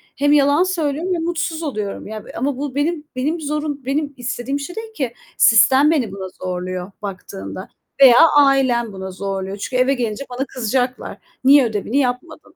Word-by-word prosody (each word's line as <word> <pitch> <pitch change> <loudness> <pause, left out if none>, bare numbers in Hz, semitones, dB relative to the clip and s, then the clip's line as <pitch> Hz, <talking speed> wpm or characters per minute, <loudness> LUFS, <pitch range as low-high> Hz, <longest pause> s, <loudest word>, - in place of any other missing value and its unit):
hem 290 +1 +2
yalan 290 +4 +4
söylüyorum 340 -1 -1
ve - - 0
mutsuz 330 -1 -2
oluyorum 210 -11 -4
ya, 215 0 -7
b - - -14
eee, - - -11
ama 265 +2 -1
bu 280 -2 -4
benim 300 +1 -1
benim 300 +6 -1
zorun 295 -2 -3
benim 285 +1 -1
istediğim 245 +3 -3
şey 350 +7 -7
değil 445 0 -7
ki. 255 - -3 0.2
Sistem 260 +7 +6
beni 250 -11 0
buna 190 -1 -6 0.2
zorluyor 185 +1 -4
baktığında 195 -1 -7 0.3
veya 245 -3 +9 0.2
ailem 260 -6 +3
buna 190 0 -6
zorluyor. 195 +1 -4
Çünkü 255 +5 -5
eve 275 +2 +1
gelince 240 +1 -3
bana 255 +2 -3
kızacaklar. 250 0 -2 0.3
"Niye 275 -1 +6
ödevini 220 +4 -2
yapmadın?" 280 +5 -3
265 Hz, 170 wpm, -20 LUFS, 215-290 Hz, 0.3 s, veya